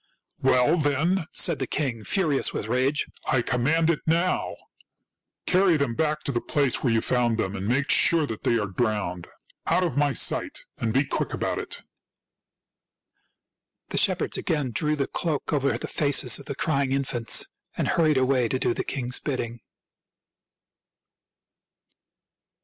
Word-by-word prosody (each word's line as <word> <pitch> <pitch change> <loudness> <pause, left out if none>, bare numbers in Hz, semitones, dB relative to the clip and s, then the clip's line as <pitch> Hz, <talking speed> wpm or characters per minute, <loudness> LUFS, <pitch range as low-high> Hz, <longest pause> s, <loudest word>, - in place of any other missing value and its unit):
" - - -38
Well, 130 +5 +3
then," 155 +4 0
said 165 -6 +2
the 130 - -2
king, 130 -7 -2
furious 155 - +1
with - - -4
rage, 130 +6 0
" - - -25
I 130 -2 +2
command 150 +8 +2
it 155 - -2
now. 170 +3 0 0.9
Carry 185 -2 +3
them 140 -5 -1
back 150 +3 -1
to - - -1
the 120 -3 -1
place 140 -4 0
where 125 - +1
you 115 -1 +2
found 120 -3 +1
them, 100 -3 -2
and 95 0 -4
make 135 +5 +1
sure 165 -2 +4
that 110 -5 -6
they 115 - +2
are 105 - -1
drowned. 95 -4 -2 0.4
Out 185 - +2
of 155 -7 -2
my 145 -1 +2
sight, - - 0
and 115 - -1
be 135 +5 +2
quick - - -2
about - - -2
it!" - - -7 2.1
The - - +1
shepherds - - +1
again 145 -6 -1
drew 150 +7 0
the 140 -2 -1
cloak 155 -1 -2
over 140 -2 +1
the - - -6
faces 140 -4 +2
of 140 - -12
the 140 - -4
crying 140 -3 0
infants, 130 -4 +1 0.3
and - - 0
hurried 155 -4 +2
away 130 -2 +2
to 130 - -1
do 120 - 0
the - - -3
king's 125 -2 -1
bidding. 120 -5 -4
135 Hz, 160 wpm, -25 LUFS, 120-150 Hz, 2.1 s, sure